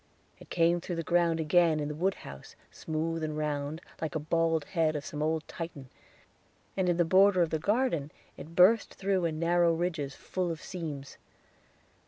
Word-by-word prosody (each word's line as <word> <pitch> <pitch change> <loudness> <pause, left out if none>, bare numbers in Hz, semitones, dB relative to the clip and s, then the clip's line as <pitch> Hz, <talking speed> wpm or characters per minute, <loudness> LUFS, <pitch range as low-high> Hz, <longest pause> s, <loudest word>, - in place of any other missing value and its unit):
It - - -15
came 170 0 +2
through 175 - -4
the 165 - -3
ground 170 0 +2
again 160 0 +3
in 145 - -2
the 150 - -4
woodhouse, 155 - -4 0.2
smooth 160 +1 -3
and 155 -1 -3
round, 150 +1 -3 0.2
like 160 -3 -3
the 155 - -1
bald 165 0 +1
head 160 -3 0
of 150 - -4
some 150 - -5
old 155 0 -1
Titan, 150 -6 -7 0.9
and 185 -2 +1
in 175 - +1
the 175 - +3
border 185 +1 +5
of 165 - -3
the 160 - 0
garden 200 - 0 0.2
it 160 +4 -11
burst 200 +5 +5
through 190 -2 0
in 160 -2 -2
narrow 170 0 +3
ridges 165 -5 -2
full 185 -2 -3
of 165 -2 -4
seams. 155 -8 -7
165 Hz, 180 wpm, -29 LUFS, 155-175 Hz, 0.9 s, border